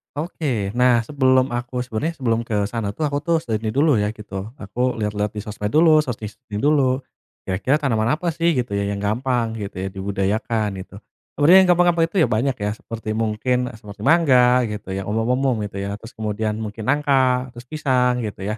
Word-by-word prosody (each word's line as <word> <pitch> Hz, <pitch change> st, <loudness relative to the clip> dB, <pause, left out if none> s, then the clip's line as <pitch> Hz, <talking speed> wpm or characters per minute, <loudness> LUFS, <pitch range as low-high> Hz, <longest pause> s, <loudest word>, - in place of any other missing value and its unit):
Oke, 140 Hz, -, -2 dB
nah 120 Hz, -1 st, +3 dB
sebelum 130 Hz, -1 st, +2 dB
aku 120 Hz, +1 st, -3 dB
sebenarnya 130 Hz, +8 st, -3 dB
sebelum 115 Hz, -5 st, 0 dB
ke 105 Hz, -2 st, 0 dB
sana 105 Hz, -4 st, -3 dB
tuh 155 Hz, -, -3 dB
aku 145 Hz, -, -1 dB
tuh 165 Hz, +2 st, 0 dB
sudah 110 Hz, -2 st, -1 dB
ini 110 Hz, -1 st, -3 dB
dulu 140 Hz, -5 st, +4 dB
ya 105 Hz, -, +1 dB
gitu, 105 Hz, -2 st, -13 dB, 0.2 s
aku 125 Hz, +3 st, -2 dB
liat-liat 105 Hz, 0 st, -1 dB
di 105 Hz, -, -3 dB
sosmed 105 Hz, -1 st, -4 dB
dulu, 155 Hz, 0 st, +6 dB
searching-searching 110 Hz, -4 st, -5 dB
dulu. 135 Hz, -3 st, +2 dB, 0.4 s
Kira-kira 100 Hz, +9 st, 0 dB
tanaman 115 Hz, -1 st, +1 dB
apa 175 Hz, +2 st, -5 dB
sih 170 Hz, +1 st, +1 dB
gitu 125 Hz, -3 st, -2 dB
ya 100 Hz, -, 0 dB
yang 100 Hz, -, -3 dB
gampang 115 Hz, +1 st, 0 dB
gitu 100 Hz, -1 st, -6 dB
ya, -, -, -2 dB
dibudayakan 100 Hz, +3 st, -1 dB
gitu. 100 Hz, -, -13 dB, 0.4 s
Sebenarnya 160 Hz, +6 st, +7 dB
yang 180 Hz, -, +1 dB
gampang-gampang 175 Hz, -1 st, +4 dB
itu -, -, -19 dB
ya -, -, +3 dB
banyak 125 Hz, +4 st, +1 dB
ya, 105 Hz, -1 st, -2 dB
seperti 110 Hz, 0 st, -8 dB
mungkin, 110 Hz, +3 st, 0 dB, 0.2 s
seperti 105 Hz, -1 st, -12 dB
mangga, 125 Hz, -5 st, +4 dB
gitu, 105 Hz, -2 st, -6 dB
yang 95 Hz, 0 st, -3 dB
umum-umum 120 Hz, +2 st, 0 dB
gitu 100 Hz, -, -9 dB
ya, 100 Hz, -, -3 dB
terus 115 Hz, 0 st, -13 dB
kemudian 110 Hz, 0 st, -2 dB
mungkin 110 Hz, 0 st, -6 dB
nangka, 130 Hz, -3 st, +2 dB
terus 120 Hz, 0 st, -11 dB
pisang 125 Hz, -5 st, +1 dB
gitu 105 Hz, -2 st, -7 dB
ya. 105 Hz, +3 st, -3 dB
120 Hz, 190 wpm, -21 LUFS, 105-135 Hz, 0.4 s, Sebenarnya